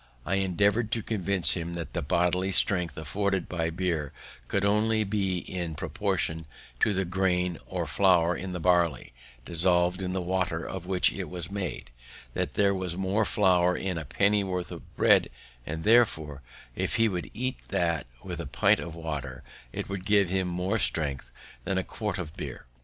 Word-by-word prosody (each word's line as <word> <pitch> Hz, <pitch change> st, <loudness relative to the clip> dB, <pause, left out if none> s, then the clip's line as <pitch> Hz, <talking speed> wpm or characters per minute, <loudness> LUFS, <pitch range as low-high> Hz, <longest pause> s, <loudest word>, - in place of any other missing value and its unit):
I 95 Hz, -, +1 dB
endeavoured 100 Hz, +4 st, +2 dB
to 115 Hz, -4 st, 0 dB
convince 100 Hz, -4 st, +1 dB
him 85 Hz, -1 st, -4 dB
that 85 Hz, -4 st, -6 dB
the -, -, -1 dB
bodily 90 Hz, +5 st, +1 dB
strength 90 Hz, -2 st, +2 dB
afforded 95 Hz, +4 st, -1 dB
by 85 Hz, -2 st, -1 dB
beer 85 Hz, -4 st, -2 dB, 0.4 s
could 100 Hz, 0 st, 0 dB
only 110 Hz, +2 st, +3 dB
be 100 Hz, -3 st, 0 dB
in 85 Hz, -2 st, -4 dB
proportion 80 Hz, +2 st, -1 dB, 0.3 s
to -, -, +3 dB
the 95 Hz, -1 st, 0 dB
grain 90 Hz, -1 st, 0 dB
or -, -, -2 dB
flour 90 Hz, -3 st, +3 dB
of 95 Hz, +1 st, -5 dB
the 90 Hz, -, -4 dB
barley 85 Hz, -7 st, +2 dB, 0.3 s
dissolved 90 Hz, +2 st, +2 dB
in 90 Hz, -1 st, -2 dB
the 95 Hz, -, 0 dB
water 90 Hz, -2 st, -1 dB
of 90 Hz, -2 st, -6 dB
which 95 Hz, -1 st, +3 dB
it 95 Hz, -5 st, -5 dB
was 90 Hz, +2 st, -5 dB
made; 95 Hz, -10 st, -4 dB, 0.4 s
that -, -, -2 dB
there 100 Hz, -1 st, +3 dB
was 90 Hz, -2 st, -3 dB
more 95 Hz, +3 st, +1 dB
flour 90 Hz, -3 st, +3 dB
in 90 Hz, -3 st, -2 dB
a -, -, -5 dB
pennyworth 95 Hz, 0 st, +1 dB
of -, -, -7 dB
bread; -, -, +5 dB, 0.4 s
and 80 Hz, +1 st, -4 dB
therefore, 80 Hz, -, +3 dB, 0.3 s
if -, -, -1 dB
he 115 Hz, 0 st, +4 dB
would 90 Hz, -4 st, -3 dB
eat 130 Hz, +1 st, -3 dB
that 85 Hz, -6 st, 0 dB, 0.2 s
with -, -, -5 dB
a -, -, -6 dB
pint -, -, +3 dB
of 85 Hz, -1 st, -6 dB
water, 70 Hz, -6 st, -5 dB, 0.3 s
it -, -, -4 dB
would 95 Hz, -2 st, -4 dB
give 100 Hz, -3 st, +4 dB
him 95 Hz, 0 st, 0 dB
more 90 Hz, +5 st, -1 dB
strength 70 Hz, -9 st, 0 dB, 0.3 s
than 95 Hz, -, -1 dB
a 95 Hz, -, +1 dB
quart 105 Hz, -1 st, -4 dB
of 80 Hz, -4 st, -6 dB
beer. -, -, -7 dB
90 Hz, 175 wpm, -28 LUFS, 85-100 Hz, 0.4 s, bread